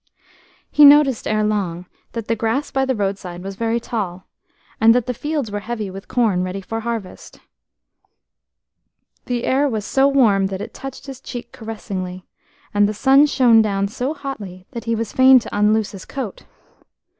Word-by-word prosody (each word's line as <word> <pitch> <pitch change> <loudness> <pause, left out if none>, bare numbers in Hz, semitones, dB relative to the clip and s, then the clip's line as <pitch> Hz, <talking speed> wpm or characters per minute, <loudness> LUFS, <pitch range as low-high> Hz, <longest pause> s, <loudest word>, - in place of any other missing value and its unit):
E - - +10
noticed 285 -4 +6
ere 215 0 +1
long 190 -5 -2 0.3
that 230 -2 -5
the 230 - +1
grass 230 +6 -1
by 270 -1 +1
the 260 -1 0
roadside 195 -4 -4
was 195 0 -6
very 230 +2 -1
tall, 190 -6 -4 0.6
and 225 +1 +6
that 245 -2 +1
the 250 - -2
fields 290 -2 -3
were 205 - -3
heavy 215 -2 -5
with 195 +1 -10
corn 220 -7 +1
ready 185 +1 -4
for 225 +4 -5
harvest. 225 -4 -6 1.9
The 245 -1 -2
air 280 +2 +2
was 215 -4 -3
so 270 +3 +3
warm 220 -9 +3
that 190 -1 -5
it - - -7
touched 270 0 -8
his 270 -2 -9
cheek 240 -1 -8
caressingly, 185 -5 -6 0.5
and 205 0 +3
the 215 - -4
sun 275 +6 +5
shone 245 -5 +5
down 200 -2 0
so 260 +7 -3
hotly 205 - -7
that 235 - -7
he 230 0 0
was 225 -1 -4
fain 260 0 +7
to 240 - -3
unloose 210 +1 +2
his 195 - -10
coat. 255 -8 -6
225 Hz, 175 wpm, -20 LUFS, 200-260 Hz, 1.9 s, E